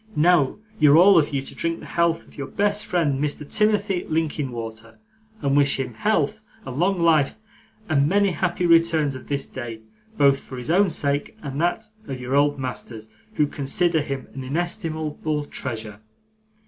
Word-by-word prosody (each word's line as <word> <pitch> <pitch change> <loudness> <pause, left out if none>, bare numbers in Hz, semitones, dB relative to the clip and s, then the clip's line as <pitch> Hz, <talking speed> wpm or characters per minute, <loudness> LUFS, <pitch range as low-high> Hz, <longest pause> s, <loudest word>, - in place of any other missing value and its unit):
Now, 155 -3 +3 0.2
you're 150 0 +7
all 185 +1 +7
of 150 - 0
you 135 -2 -1
to - - -9
drink 165 0 -2
the - - -11
health 170 -1 0
of - - -19
your 140 -2 -5
best 205 +1 0
friend 145 -6 +1
Mr. 150 0 -3
Timothy 210 -2 +1
Linkinwater, 120 -8 -3 0.5
and 140 0 +2
wish 140 -1 +3
him 125 -2 -3
health 215 - 0 0.2
and 130 - -6
long 185 +1 +2
life 160 -4 +3 0.5
and 145 -2 +2
many 200 +1 +3
happy 175 +2 -1
returns 165 -4 +3
of 130 - -10
this 140 -1 -1
day, 120 -4 -7 0.4
both 140 -1 +4
for 130 - -10
his 125 +5 -3
own 195 +2 +4
sake 145 -3 -2
and 140 +1 -4
that 175 +6 0 0.2
of 135 -2 -5
your 125 +2 -2
old 145 0 +3
masters, 120 -4 -6 0.3
who 150 - +3
consider 160 +4 0
him 135 -2 -5
an 135 - -6
inestimable 155 -1 -3
treasure. 110 -7 -5
150 Hz, 170 wpm, -23 LUFS, 135-170 Hz, 0.5 s, you're